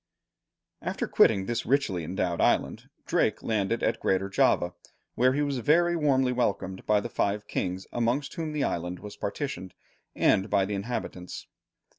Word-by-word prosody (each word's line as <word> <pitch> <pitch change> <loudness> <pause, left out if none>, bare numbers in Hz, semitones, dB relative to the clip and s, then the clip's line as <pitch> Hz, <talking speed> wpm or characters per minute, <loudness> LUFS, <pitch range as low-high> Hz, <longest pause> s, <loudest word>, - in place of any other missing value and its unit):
After - - -2
quitting 95 -1 +4
this 120 +2 -2
richly 115 - +1
endowed 90 +1 -1
island, - - +1 0.2
Drake - - +1
landed 110 0 0
at - - +1
Greater 95 +1 0
Java, 90 -2 +2 0.4
where 130 +1 +3
he 145 +2 +1
was 140 -3 -1
very 170 +6 +3
warmly 135 -5 +2
welcomed 100 -6 -1
by 105 -1 +4
the 120 - -4
five 105 -2 -1
kings 95 +1 -3
amongst 120 +4 0
whom 160 -2 -3
the 150 -2 -1
island 90 +1 -2
was 105 +3 -9
partitioned, 100 -5 -4 0.4
and 95 +3 +3
by 100 -2 +3
the 105 - -4
inhabitants. 100 -4 -5
105 Hz, 155 wpm, -28 LUFS, 95-130 Hz, 0.4 s, quitting